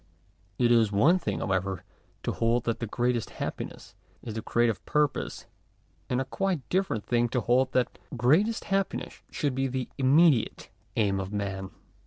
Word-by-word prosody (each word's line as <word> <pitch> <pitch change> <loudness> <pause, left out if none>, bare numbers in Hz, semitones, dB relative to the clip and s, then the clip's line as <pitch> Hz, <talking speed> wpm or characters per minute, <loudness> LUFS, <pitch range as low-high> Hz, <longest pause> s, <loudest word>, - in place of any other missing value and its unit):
It 120 -1 +3
is 115 -3 +4
one 145 - +4
thing, - - -3
however, 95 -2 -1 0.4
to - - -1
hold 115 +1 +1
that 115 - -1
greatest 120 -1 0
happiness - - -6 0.3
is 115 - -5
• - - -10
the 110 - -3
creative 115 -3 +1
purpose, 150 -2 0 0.6
and 125 - +1
a 135 - -1
quite 180 0 -2
different 185 - 0
thing 120 0 +2
to 125 +1 0
hold 130 +2 +2
that 125 -2 0 0.2
greatest 190 - +3
happiness 195 -1 -2
should 145 -4 -1
be 135 +1 0
the 130 -1 -3
immediate 140 -1 +3 0.3
aim 100 -3 +2
of 95 0 -4
man. 95 -2 -3
120 Hz, 160 wpm, -28 LUFS, 110-140 Hz, 0.6 s, is